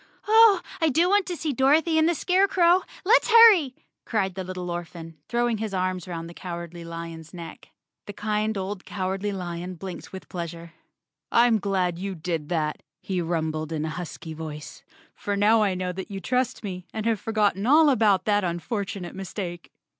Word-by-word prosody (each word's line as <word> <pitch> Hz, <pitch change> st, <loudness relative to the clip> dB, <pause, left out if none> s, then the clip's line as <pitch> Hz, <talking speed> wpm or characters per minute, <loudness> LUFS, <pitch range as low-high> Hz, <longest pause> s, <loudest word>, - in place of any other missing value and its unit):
"Oh, 435 Hz, -3 st, +7 dB, 0.2 s
I 320 Hz, -, +4 dB
do 330 Hz, +5 st, +3 dB
want 405 Hz, -1 st, +3 dB
to 360 Hz, -, -3 dB
see 310 Hz, -3 st, -2 dB
Dorothy 310 Hz, +6 st, +3 dB
and 315 Hz, +1 st, +4 dB
the 345 Hz, -, +1 dB
Scarecrow! 365 Hz, 0 st, +3 dB, 0.2 s
Let's 475 Hz, +4 st, +4 dB
hurry," 425 Hz, -, +7 dB, 0.3 s
cried 195 Hz, -5 st, -1 dB
the 190 Hz, +1 st, -5 dB
little 180 Hz, -1 st, -5 dB
orphan, 165 Hz, -2 st, -7 dB
throwing 235 Hz, -1 st, 0 dB
his 215 Hz, -3 st, -3 dB
arms 185 Hz, -1 st, -2 dB
'round 165 Hz, -2 st, -5 dB
the 170 Hz, -, -10 dB
Cowardly 170 Hz, -1 st, -7 dB
Lion's 165 Hz, 0 st, -8 dB
neck. 170 Hz, -1 st, -10 dB, 0.4 s
The 205 Hz, -, -6 dB
kind 215 Hz, +1 st, -1 dB
old 195 Hz, 0 st, -4 dB
Cowardly 195 Hz, +1 st, -3 dB
Lion 180 Hz, -1 st, -5 dB
blinked 185 Hz, +1 st, -8 dB
with 190 Hz, -, -9 dB
pleasure. 170 Hz, -1 st, -7 dB, 0.3 s
" 150 Hz, +2 st, -62 dB
I'm 235 Hz, -2 st, +4 dB
glad 185 Hz, -3 st, -1 dB
you 195 Hz, 0 st, -4 dB
did 160 Hz, -2 st, -4 dB
that," 155 Hz, -3 st, -1 dB, 0.2 s
he 185 Hz, -2 st, -2 dB
rumbled 160 Hz, -2 st, -2 dB
in 155 Hz, -1 st, -2 dB
a -, -, -3 dB
husky 165 Hz, -1 st, -7 dB
voice, 155 Hz, -1 st, -8 dB, 0.2 s
" -, -, -31 dB
for 205 Hz, -, 0 dB
now 215 Hz, +2 st, +4 dB
I 200 Hz, -3 st, +1 dB
know 180 Hz, 0 st, -2 dB
that 190 Hz, +1 st, -7 dB
you 195 Hz, -1 st, -5 dB
trust 250 Hz, +7 st, -1 dB
me, 185 Hz, -3 st, -6 dB
and 220 Hz, -1 st, -4 dB
have 225 Hz, -3 st, +1 dB
forgotten 210 Hz, -1 st, 0 dB
all 305 Hz, +3 st, +6 dB
about 210 Hz, -6 st, +3 dB
that 205 Hz, -1 st, +2 dB
unfortunate 185 Hz, +1 st, -3 dB
mistake!" 185 Hz, -2 st, -6 dB
190 Hz, 185 wpm, -25 LUFS, 170-230 Hz, 0.4 s, Oh